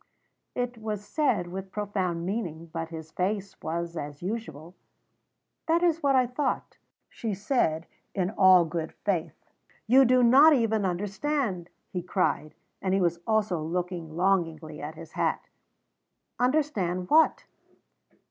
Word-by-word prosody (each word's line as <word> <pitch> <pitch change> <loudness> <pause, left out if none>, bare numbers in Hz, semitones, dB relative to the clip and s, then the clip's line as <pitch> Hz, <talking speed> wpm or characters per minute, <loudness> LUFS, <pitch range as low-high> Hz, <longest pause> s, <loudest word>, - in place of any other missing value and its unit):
It 245 -1 -3
was 210 -2 -4
said 210 - +1
with 190 +1 -6
profound 190 -5 -2
meaning; 170 -5 -4
but 165 -1 -4
his 160 -1 -8
face 195 +1 -2
was 170 +1 -3
as 145 0 -6
usual. 175 -6 -5 0.9
"That 335 +2 +3
is 335 -2 +2
what 275 -1 +3
I 255 -1 +5
thought," 255 +2 -3 0.3
she 220 -4 -4
said, 185 - 0 0.3
in 185 -1 0
all 185 -4 +6
good 160 0 -4
faith. 175 -6 0 0.5
"You 260 +4 +6
do 255 0 +4
not 275 +7 +8
even 220 -5 +2
understand!" 200 - -2 0.2
he 180 - -2
cried, 160 -4 -1 0.3
and 190 -1 +1
he - - +2
was 170 -2 +1
also 215 -6 +1
looking 170 0 -4
longingly 170 -5 0
at 150 +3 -6
his - - -11
hat. - - -1 0.9
"Understand 245 - 0
what?" 320 +1 +5
190 Hz, 135 wpm, -27 LUFS, 170-235 Hz, 0.9 s, not